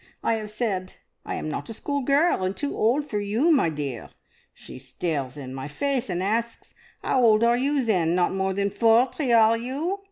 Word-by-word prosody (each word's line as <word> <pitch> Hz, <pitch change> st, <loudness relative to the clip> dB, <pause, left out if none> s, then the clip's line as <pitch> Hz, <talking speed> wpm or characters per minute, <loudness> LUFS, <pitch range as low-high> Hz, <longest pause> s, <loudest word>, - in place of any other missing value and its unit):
I -, -, +2 dB
have 215 Hz, -1 st, -4 dB
said, 205 Hz, -4 st, -3 dB, 0.3 s
`I -, -, -3 dB
am -, -, -4 dB
not 155 Hz, -, -5 dB
a 225 Hz, -, -6 dB
schoolgirl, 285 Hz, -, +1 dB
and 185 Hz, +1 st, -2 dB
too 285 Hz, -, -3 dB
old 255 Hz, +7 st, +1 dB
for 210 Hz, -7 st, -3 dB
you, 220 Hz, +11 st, +1 dB
my 270 Hz, -, +3 dB
dear.' 145 Hz, -6 st, -5 dB, 0.4 s
She -, -, -12 dB
stares 135 Hz, 0 st, -4 dB
in 130 Hz, -2 st, -7 dB
my 135 Hz, +1 st, -6 dB
face, 265 Hz, -, -2 dB
and 180 Hz, 0 st, -2 dB
asks, 230 Hz, +3 st, -2 dB, 0.3 s
`'Ow -, -, 0 dB
old 225 Hz, -3 st, +4 dB
are 235 Hz, +1 st, +4 dB
you 270 Hz, +1 st, 0 dB
then? 175 Hz, -6 st, +1 dB
Not 180 Hz, 0 st, +1 dB
more 190 Hz, 0 st, -1 dB
than 200 Hz, 0 st, 0 dB
forty, 240 Hz, +5 st, +2 dB
are 225 Hz, -1 st, +5 dB
you?' 280 Hz, +12 st, -3 dB
220 Hz, 195 wpm, -25 LUFS, 180-255 Hz, 0.4 s, are